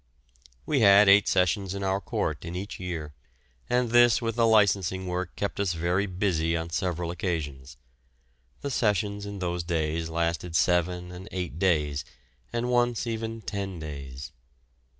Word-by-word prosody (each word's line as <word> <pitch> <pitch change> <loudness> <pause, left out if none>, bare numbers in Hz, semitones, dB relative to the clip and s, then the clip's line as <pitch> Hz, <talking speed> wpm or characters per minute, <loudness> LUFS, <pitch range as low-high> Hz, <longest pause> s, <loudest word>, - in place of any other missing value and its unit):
We 145 - +1
had 100 -2 +7
eight 100 +1 +6
sessions 95 +1 +1
in 100 - -4
our 95 +1 0
court 80 -4 -2
in 85 +1 -6
each 100 +3 -5
year, 85 -5 -5 0.6
and 125 -1 +1
this 120 -4 +6
with 115 -1 -2
the 115 -1 +3
licensing 100 -4 +3
work 90 0 -3
kept 100 - -3
us 100 -3 +1
very 90 +4 0
busy 90 -3 0
on 80 +1 -5
several 85 0 -2
occasions. 75 -6 -4 0.8
The 140 - -3
sessions 105 -3 0
in 100 0 -6
those 90 -2 -2
days 80 -1 -1
lasted 85 0 -2
seven 90 +1 +1
and 90 +3 -9
eight 90 -4 -4
days, 75 -6 +1 0.5
and 120 +1 -1
once 120 -1 +2
even 115 -1 -4
ten 100 -3 -4
days. 70 -2 -7
90 Hz, 150 wpm, -27 LUFS, 85-100 Hz, 0.8 s, had